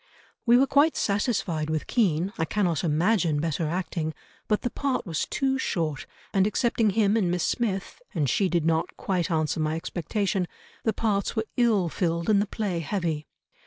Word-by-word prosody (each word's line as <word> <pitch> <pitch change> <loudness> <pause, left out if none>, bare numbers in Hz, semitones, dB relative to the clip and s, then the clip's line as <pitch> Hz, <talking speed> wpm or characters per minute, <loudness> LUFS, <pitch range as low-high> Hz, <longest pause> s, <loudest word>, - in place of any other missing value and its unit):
"We 240 +1 +7
were 265 - +5
quite 290 +3 +3
satisfied 200 -7 0
with 155 -1 -1
Kean, 190 -4 +1
I - - +2
cannot 175 -2 0
imagine 165 0 +2
better 160 0 -1
acting, 165 -2 -2 0.3
but 210 - +1
the 245 - -1
part 275 -2 -1
was 165 -5 -2
too 270 -1 0
short 155 - -2 0.3
and 195 0 +4
excepting 230 0 +2
him 205 0 +2
and 200 -6 +2
Miss 175 -1 0
Smith,—and 195 - -2
she 190 - +2
did 170 -3 +1
not 165 +1 0
quite 180 -4 -1
answer 155 -1 0
my 155 0 0
expectation,—the 185 +5 -3
parts 200 -1 0
were 220 -1 0
ill 220 -7 +3
filled 170 +3 0
and 200 -1 +4
the 205 - -1
play 195 -5 -2
heavy. 165 -3 -2
185 Hz, 165 wpm, -26 LUFS, 165-215 Hz, 0.3 s, We